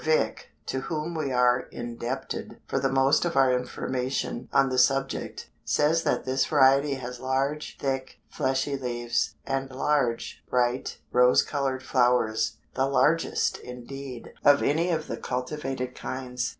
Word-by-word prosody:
Vick, 155 Hz, 0 st, +1 dB, 0.2 s
to 130 Hz, -, -2 dB
whom 155 Hz, +3 st, -3 dB
we 155 Hz, -4 st, -2 dB
are 125 Hz, 0 st, +4 dB
indebted 120 Hz, +2 st, -5 dB
for -, -, -1 dB
the 135 Hz, -, 0 dB
most 135 Hz, +2 st, +4 dB
of 175 Hz, -3 st, -1 dB
our 135 Hz, -1 st, +5 dB
information 125 Hz, 0 st, -3 dB
on 135 Hz, 0 st, +4 dB
this 130 Hz, -1 st, +5 dB
subject, 135 Hz, 0 st, -3 dB, 0.2 s
says 155 Hz, +3 st, +2 dB
that -, -, 0 dB
this 130 Hz, +1 st, +1 dB
variety 140 Hz, -1 st, +4 dB
has 125 Hz, -1 st, -7 dB
large, 135 Hz, +3 st, -1 dB
thick, 135 Hz, -1 st, -2 dB
fleshy 135 Hz, +2 st, -1 dB
leaves, 120 Hz, -3 st, -1 dB
and 135 Hz, 0 st, -2 dB
large, 130 Hz, -3 st, 0 dB
bright, 125 Hz, 0 st, 0 dB
rose 125 Hz, 0 st, +5 dB
colored 135 Hz, -2 st, -2 dB
flowers, 120 Hz, -4 st, +2 dB, 0.2 s
the 135 Hz, +1 st, +1 dB
largest, 140 Hz, +5 st, +2 dB
indeed, 125 Hz, 0 st, -8 dB
of 145 Hz, 0 st, +6 dB
any 165 Hz, +5 st, +2 dB
of 160 Hz, -2 st, 0 dB
the -, -, -5 dB
cultivated 130 Hz, 0 st, -3 dB
kinds. 125 Hz, -2 st, -4 dB
130 Hz, 140 wpm, -27 LUFS, 125-140 Hz, 0.2 s, of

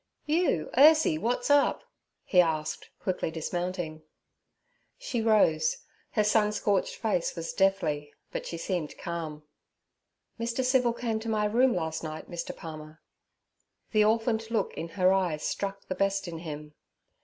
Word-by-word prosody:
'You, 310 Hz, -, +1 dB
Ursie! 300 Hz, -, +6 dB
What's 245 Hz, -, 0 dB
up?' 285 Hz, -1 st, +4 dB, 0.4 s
he 180 Hz, -, +5 dB
asked, 155 Hz, -3 st, -2 dB
quickly 185 Hz, -3 st, -2 dB
dismounting. 170 Hz, 0 st, -3 dB, 1.0 s
She 275 Hz, -, -3 dB
rose; 225 Hz, -, +3 dB, 0.4 s
her 215 Hz, -, +3 dB
sun 210 Hz, 0 st, +3 dB
scorched 200 Hz, -2 st, 0 dB
face 210 Hz, -7 st, -1 dB
was 165 Hz, -1 st, -4 dB
deathly, 160 Hz, -7 st, +1 dB, 0.2 s
but -, -, -4 dB
she 170 Hz, -, -5 dB
seemed 170 Hz, -3 st, -3 dB
calm. 160 Hz, -3 st, -5 dB, 1.0 s
'Mr. 235 Hz, +2 st, -1 dB
Civil 250 Hz, -2 st, +3 dB
came 230 Hz, -2 st, -2 dB
to 225 Hz, +1 st, -5 dB
my 215 Hz, -1 st, +1 dB
room 240 Hz, +4 st, +3 dB
last 160 Hz, -2 st, -2 dB
night, 155 Hz, 0 st, -6 dB
Mr. 170 Hz, -1 st, -5 dB
Palmer.' 155 Hz, -1 st, -9 dB, 0.9 s
The 215 Hz, -1 st, +4 dB
orphaned 225 Hz, +1 st, +1 dB
look 220 Hz, -4 st, 0 dB
in 165 Hz, -, -5 dB
her 185 Hz, 0 st, +5 dB
eyes 175 Hz, -6 st, 0 dB
struck 195 Hz, 0 st, -3 dB
the -, -, -3 dB
best 195 Hz, 0 st, 0 dB
in 165 Hz, -1 st, -6 dB
him. 150 Hz, -2 st, -7 dB
195 Hz, 145 wpm, -28 LUFS, 160-225 Hz, 1.0 s, Ursie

